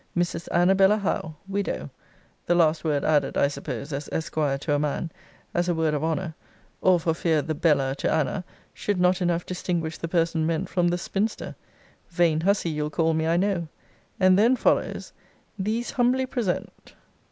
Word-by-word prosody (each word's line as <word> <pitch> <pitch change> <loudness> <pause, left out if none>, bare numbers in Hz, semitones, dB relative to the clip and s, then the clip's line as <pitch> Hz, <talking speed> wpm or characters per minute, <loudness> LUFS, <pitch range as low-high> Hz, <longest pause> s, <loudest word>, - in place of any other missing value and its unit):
] - - -9
Mrs. 175 -1 -1
ANABELLA 190 +3 +4
HOWE, 170 -6 -2
widow, 200 0 -3 0.6
the 175 - +3
last 160 -2 +3
word 150 -3 0
added, 145 -3 +2
I 140 - +4
suppose 140 0 -5
as 140 +2 -4
Esquire 155 -3 -1
to 145 +2 -2
a 145 - +2
man, 150 +3 -2 0.4
as 175 +1 0
a 175 - +1
word 160 -1 +1
of 150 0 -1
honour; 160 +1 -1 0.5
or 185 -2 +4
for 165 0 0
fear 160 -2 +1
the 160 - -2
bella 145 -4 +2
to - - 0
Anna, 160 +4 0 0.3
should 205 -3 -2
not 180 +1 +3
enough 175 -1 0
distinguish 170 -3 -3
the 165 - -3
person 165 -2 +1
meant 165 -1 -1
from 175 -1 +1
the 175 0 +1
spinster: 205 +4 -2 0.6
[vain 170 -3 +2
hussy 190 -2 +1
you'll 150 0 -2
call 160 +2 +1
me, 160 0 0
I 165 +1 +2
know:] 185 -3 0 0.5
And 185 0 +5
then 235 +5 +5
follows; - - 0 0.5
These 220 +5 -1
humbly 255 0 +2
present. 240 -8 -4
170 Hz, 175 wpm, -25 LUFS, 155-185 Hz, 0.6 s, And